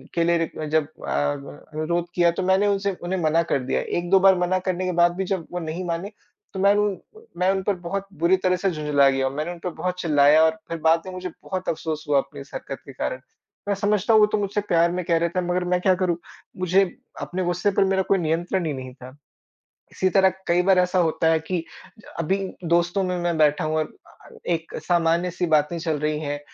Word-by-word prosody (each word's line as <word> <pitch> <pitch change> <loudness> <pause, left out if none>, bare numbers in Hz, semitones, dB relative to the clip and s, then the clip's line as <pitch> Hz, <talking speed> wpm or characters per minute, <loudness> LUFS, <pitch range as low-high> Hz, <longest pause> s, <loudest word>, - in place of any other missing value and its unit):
के 170 - +2
लिए 165 -2 0
जब 155 -1 +2 0.2
अ, - - -3 0.3
व 140 +1 -10 0.2
अनुरोध 170 +3 -1
किया, 175 -1 +4
तो 175 - -3
मैंने 190 +2 +3
उनसे 200 0 +1
उन्हें 185 +1 -2
मना 160 +1 +3
कर 140 - +3
दिया। 130 - -1 0.2
1-2 175 +2 +3
बार 190 0 +6
मना 185 +1 +1
करने 185 0 -1
के 180 - 0
बाद 175 0 +4
भी 190 0 -2
जब 180 -4 -2
वो 180 - -3
नहीं 165 +2 -4
माने, 175 +5 -3 0.4
तो 190 - -5
मैं 200 +1 +5
उन 205 -1 +2 0.2
पर 445 +1 -16
मैं 185 +1 +3
उन 190 0 -1
पर 200 -1 0
बहुत 195 +3 -5
बुरी 175 +3 +4
तरह 185 0 +1
से 195 +2 0
झुँझला 150 -3 +3
गया 135 0 0
और 135 - -4
मैंने 155 +4 -3
उन 175 - -9
पर 180 - -1
बहुत 180 +2 -4
चिल्लाया 150 0 +5
और 160 - +5 0.2
फ़िर 165 - -3
बाद 165 +1 +4
में 185 - -6
मुझे 185 0 -5
बहुत 185 -1 -4
अफ़सोस 155 -1 -3
हुआ 145 -1 +3
अपनी 140 0 -7
इस 135 - -13
हरकत 135 - -6
के 140 - -11
कारण। 130 0 -3 0.5
मैं 200 - +1
समझता 205 +2 +1
हूँ 215 - +7
वो - - +8
तो 215 - 0
मुझसे 205 0 -1
प्यार 170 -3 +2
में 180 0 -2
कह 165 -1 +2
रहे 170 +1 +1
थे 185 +2 -1
मगर 180 +1 -1
मैं 180 0 +2
क्या 190 -1 +4
करूँ? 180 -2 0 0.4
मुझे 185 +2 +3 0.4
अपने 185 +1 -3
गुस्से 175 +4 0
पर - - +6
मेरा 190 0 +1
कोई 195 - +5
नियंत्रण 170 +2 -1
ही 150 - -1
नहीं 130 -1 -7
था। 130 +1 -12 0.8
इसी 185 - 0
तरह 190 0 +4 0.2
कई 175 +1 +3
बार 190 -1 +4
ऐसा 180 0 +2
होता 165 -1 +1
है 160 - +3
कि 170 +2 -3
ज 220 - -18
अभी 165 +4 +1 0.3
दोस्तों 175 +3 +1
में, 180 -1 -1
मैं 175 -2 -1
बैठा 150 0 +3
हूँ 155 0 0
अ - - +2
अ, - - -17 0.2
एक 165 -1 -2
सामान्य-सी 175 +1 +1
बातें 155 +2 +2
चल 160 -3 -1
रही 150 0 -1
हैं, 145 -1 -3
175 Hz, 235 wpm, -23 LUFS, 160-185 Hz, 0.8 s, वो